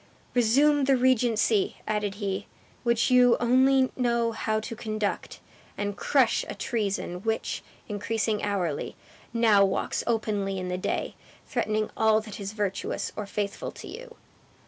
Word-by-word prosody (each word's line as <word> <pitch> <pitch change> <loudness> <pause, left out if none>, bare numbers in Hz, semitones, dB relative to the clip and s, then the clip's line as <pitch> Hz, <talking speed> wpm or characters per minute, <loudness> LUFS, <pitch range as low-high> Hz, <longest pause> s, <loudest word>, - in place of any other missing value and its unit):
"Resume 275 +5 +4
the 270 -1 +4
regency," 235 -4 +2
added 210 -2 -1
he; 200 -1 -3 0.3
"which 235 0 +2
you 250 -1 +6
only 260 +2 +4
know 235 -2 +1
how 220 -1 -1
to 230 +2 -6
conduct; 215 -2 -3 0.4
and 205 -1 -2
crush 255 -1 +2
a - - -5
treason 200 -5 -2
which, 225 +1 -2 0.3
increasing 215 +1 -1
hourly, 185 -7 -2 0.4
now 225 -4 +5
walks 195 - 0
openly 210 -4 0
in 185 -1 -4
the 180 - -2
day, - - -2 0.3
threatening 215 0 -1
all 220 -1 +4
that 215 0 -9
is 200 +1 -5
virtuous, 205 -3 -2
or 210 - -5
faithful 200 0 -3
to - - -10
you." - - -10
220 Hz, 140 wpm, -27 LUFS, 205-240 Hz, 0.4 s, you